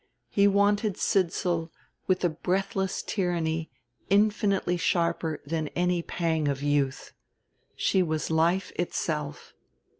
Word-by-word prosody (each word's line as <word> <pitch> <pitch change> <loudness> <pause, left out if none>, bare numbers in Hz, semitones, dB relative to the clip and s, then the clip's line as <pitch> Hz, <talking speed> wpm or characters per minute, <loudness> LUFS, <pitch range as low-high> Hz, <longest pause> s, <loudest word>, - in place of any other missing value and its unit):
He 200 0 +4
wanted 200 0 +2
Sidsall 175 -3 0 0.4
with 185 -1 +2
a - - +4
breathless 190 +4 -1
tyranny 165 -4 -1 0.4
infinitely 200 -2 +2
sharper 170 -2 0
than 155 +1 -2
any 180 0 +1
pang 165 -3 -1
of 140 0 -1
youth: 145 -2 0 0.6
she 190 - +2
was 160 -2 -1
life 170 +4 +2
itself. 150 -4 -3
175 Hz, 110 wpm, -27 LUFS, 160-195 Hz, 0.6 s, He